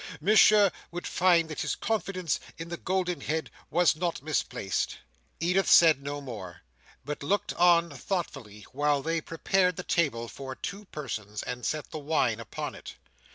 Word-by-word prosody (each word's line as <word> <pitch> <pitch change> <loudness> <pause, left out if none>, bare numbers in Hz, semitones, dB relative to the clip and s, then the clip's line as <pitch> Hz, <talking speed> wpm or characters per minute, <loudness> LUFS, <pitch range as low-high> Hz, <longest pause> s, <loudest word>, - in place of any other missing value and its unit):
Monsieur 210 -1 +6 0.2
would 175 +1 -6
find 175 -3 +3
that 155 - -5
his - - -1
confidence 195 -7 -1 0.2
in 165 0 -7
the 170 - -4
Golden 180 -1 -1
Head 160 +1 -2 0.2
was 175 -2 +3
not 170 -2 -2
misplaced." 125 - -1 0.4
Edith 180 +3 +2
said 160 -5 +7
no 145 +1 -4
more, 100 -10 -8 0.4
but 150 +1 -5
looked 195 +7 0
on 170 -1 +4
thoughtfully 120 - -4
while 145 +1 +1
they 165 0 0
prepared 180 +3 +1
the 180 - -5
table 135 -11 0
for 130 +2 -7
two 200 +8 -6
persons, 105 - -5
and 125 0 -5
set 155 -1 -3
the 155 - -5
wine 140 -7 +1
upon 115 - -5
it. - - -10
160 Hz, 155 wpm, -28 LUFS, 135-180 Hz, 0.4 s, said